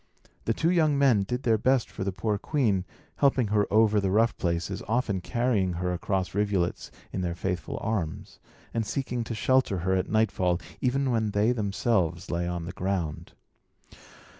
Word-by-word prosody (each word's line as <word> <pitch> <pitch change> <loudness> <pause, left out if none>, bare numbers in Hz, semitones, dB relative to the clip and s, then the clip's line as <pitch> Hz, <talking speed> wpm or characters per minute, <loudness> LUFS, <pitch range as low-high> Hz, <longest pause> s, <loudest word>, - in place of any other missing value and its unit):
The 115 - +2
two 165 +2 +2
young 155 -5 +3
men 130 -7 +4
did 125 +7 -3
their 110 -2 +3
best 130 +1 +2
for 95 - -6
the 100 - -1
poor 100 +2 -1
queen, 105 -12 +1 0.3
helping 135 -6 +3
her 105 -1 +1
over 110 0 +4
the 95 - 0
rough 110 +4 +3
places, 85 +2 -2
often 110 -4 0
carrying 110 -5 0
her 90 +1 -2
across 95 +1 -2
rivulets 100 -3 0 0.2
in 95 - -2
their 85 -2 -2
faithful 90 -2 -3
arms, 95 -8 -3 0.3
and 115 - 0
seeking 125 +1 -2
to 115 - -4
shelter 130 -3 +2
her 95 - +2
at 95 -1 0
nightfall, 95 -5 +1 0.2
even 135 +1 +1
when 110 -2 +1
they 105 +3 +2
themselves 100 -5 0
lay 85 0 -1
on 85 -1 -3
the 90 - -5
ground. 90 -5 -3
105 Hz, 170 wpm, -27 LUFS, 90-120 Hz, 0.3 s, men